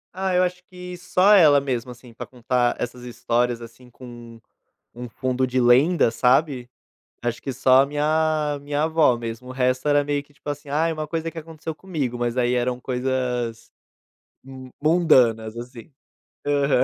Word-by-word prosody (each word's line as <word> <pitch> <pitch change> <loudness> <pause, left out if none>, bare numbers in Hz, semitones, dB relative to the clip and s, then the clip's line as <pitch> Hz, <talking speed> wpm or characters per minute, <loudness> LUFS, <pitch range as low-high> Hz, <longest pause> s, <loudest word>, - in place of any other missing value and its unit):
Ah 190 0 -1
eu 180 - +4
acho 180 0 -3
que 180 0 -9
só 185 +3 +3
ela 155 -8 +6
mesmo, 130 -3 -3
assim, 120 0 -13
pra - - -8
contar 125 0 0
essas 125 +1 -5
histórias, 120 0 -1
assim, 115 +2 -14
com 120 -2 -12 0.5
um 120 +1 -8
fundo 130 +2 -2
de 130 0 0
lenda, 130 +7 +4
sabe? 125 +2 +1 0.5
Acho 120 -1 -3
que 135 - -4
só 130 +1 +4
a - - -1
minha, 150 0 0
minha 145 +1 -2
avó 160 -6 +3
mesmo, 115 +1 -7
o - - -8
resto 130 +1 0
era 145 0 +3
meio 145 0 -1
que 145 - -27
tipo 145 - -14
assim, 145 0 -5
ai 160 +4 0
uma 155 -1 -5
coisa 165 0 -3
que 165 - -8
aconteceu 160 0 -7
comigo 150 -9 -4
mas 120 0 -2
aí 125 0 +1
eram 125 0 -1
coisas, 125 -3 -3 1.1
mundanas, 125 -10 +3
assim. 120 +3 -10 0.5
Aham. 140 -2 +2
130 Hz, 170 wpm, -23 LUFS, 120-155 Hz, 1.1 s, ela